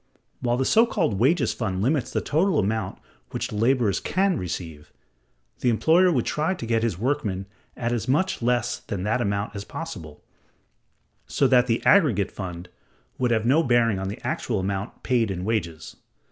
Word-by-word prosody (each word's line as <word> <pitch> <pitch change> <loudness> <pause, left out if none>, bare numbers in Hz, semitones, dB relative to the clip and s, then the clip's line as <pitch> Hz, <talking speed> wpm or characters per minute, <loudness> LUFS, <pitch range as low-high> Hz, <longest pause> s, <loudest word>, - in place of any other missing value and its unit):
While 120 -1 0
the 130 - 0
so 225 - +4
called 100 - 0
wages 140 +5 +2
fund 95 -6 -3
limits 135 +2 +1
the - - -1
total 165 +3 +1
amount 105 -1 -1 0.3
which - - -3
the - - -6
laborers 115 -2 +2
can 190 0 +1
receive, 85 - -6 0.7
the 125 - +2
employer 165 +10 +4
would 125 -8 0
try 155 +5 0
to 120 - -6
get 115 -1 +1
his 110 -7 -1
workmen 110 -5 -1 0.3
at 120 0 -2
as 120 -1 -2
much 165 +7 +1
less 120 0 0
than 100 -4 -5
that 110 +4 0
amount 100 -1 -2
as 100 - -5
possible, 95 - -8 1.0
so 140 - +1
that 125 -1 +4
the 115 -1 -1
aggregate 120 - +4
fund 90 -2 -7 0.5
would 125 -1 +1
have 110 -2 +1
no 140 +7 +4
bearing 120 -7 +2
on 95 - -3
the 100 - -5
actual 110 -5 -1
amount 95 +2 -4
paid 120 -4 +1
in 90 -1 -4
wages. 85 -8 -3
115 Hz, 175 wpm, -24 LUFS, 100-135 Hz, 1.0 s, so